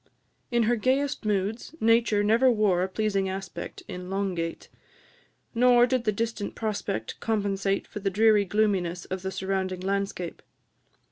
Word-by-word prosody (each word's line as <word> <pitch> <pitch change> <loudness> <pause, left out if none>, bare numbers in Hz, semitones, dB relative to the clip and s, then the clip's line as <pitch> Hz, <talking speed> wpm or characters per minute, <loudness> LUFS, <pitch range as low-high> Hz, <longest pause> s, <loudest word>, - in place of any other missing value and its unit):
In 235 -1 +2
her 240 +2 +2
gayest 260 +2 0
moods, 210 +7 -1
Nature 225 -2 +3
never 230 +5 +4
wore 210 -6 +2
a 185 - +1
pleasing 200 -1 0
aspect 190 -2 -6
in 180 0 -7
Long 195 0 -1
gate, 165 -1 -4 0.9
nor 245 0 +5
did 250 -1 -1
the 215 - +3
distant 225 -1 -3
prospect 205 - -3
compensate 200 -3 0
for - - -7
the 195 -1 0
dreary 210 +1 +4
gloominess 185 -4 0
of 185 0 -4
the 190 - -3
surrounding 190 -1 -2
landscape. 195 -2 -3
205 Hz, 145 wpm, -27 LUFS, 190-225 Hz, 0.9 s, nor